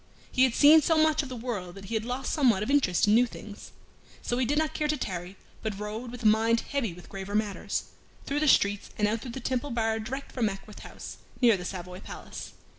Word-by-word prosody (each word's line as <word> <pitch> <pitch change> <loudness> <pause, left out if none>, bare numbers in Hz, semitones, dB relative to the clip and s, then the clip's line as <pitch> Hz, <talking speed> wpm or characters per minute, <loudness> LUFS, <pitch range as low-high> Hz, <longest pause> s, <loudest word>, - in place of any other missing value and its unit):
He 260 - +5
had 250 - 0
seen 305 +2 +8
so 325 +2 +2
much 315 -1 +4
of 275 - -7
the 255 - -5
world 215 -7 -4
that 195 0 -10
he 230 - -6
had 220 0 0
lost 250 +2 -3
somewhat 240 -10 +3
of 255 - -2
interest 255 -12 +3
in 205 - +5
new 245 +2 +5
things. 210 -2 -10 0.5
So 245 - -1
he 255 - +1
did 290 +4 +1
not 315 0 +1
care 300 - 0
to 300 0 0
tarry, 185 -4 -5 0.2
but 215 -3 -3
rode, 215 +4 -5
with 245 0 -8
a - - -5
mind 225 +2 +4
heavy 275 -8 -2
with 175 +1 -12
graver 195 +1 -6
matters, 210 -2 -1 0.4
through 285 +1 -1
the 305 - +1
streets 205 -6 +3
and 210 - +2
out 215 +1 -1
through 240 0 -7
the 265 - -5
Temple 255 +2 -2
Bar 225 -2 0
direct 265 +6 -5
for 250 - -6
Mackworth 210 -1 -3
House, - - -9 0.2
near 235 -4 +6
the 180 -2 -6
Savoy 180 0 -6
Palace. - - -9
230 Hz, 240 wpm, -28 LUFS, 205-265 Hz, 0.5 s, seen